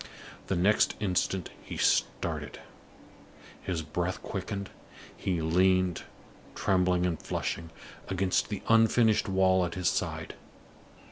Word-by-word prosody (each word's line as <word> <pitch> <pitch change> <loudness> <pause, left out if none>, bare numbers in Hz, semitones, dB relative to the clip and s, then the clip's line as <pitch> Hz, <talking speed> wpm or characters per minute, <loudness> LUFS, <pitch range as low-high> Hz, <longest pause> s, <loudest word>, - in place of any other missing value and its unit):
The 95 - 0
next 95 +5 +3
instant 95 -2 -1
he - - -8
started; - - 0 1.0
his 85 -4 -3
breath 90 +4 -2
quickened; 100 0 -5 0.4
he 85 -4 -2
leaned, 90 +1 +2 0.5
trembling 90 -1 +2
and 85 -3 -2
flushing, 80 -1 -3 0.4
against 95 -1 0
the - - -4
unfinished 115 -1 +4
wall 95 -1 +3
at 85 -1 -3
his 90 -2 +1
side. - - -3
95 Hz, 110 wpm, -29 LUFS, 90-95 Hz, 1.0 s, unfinished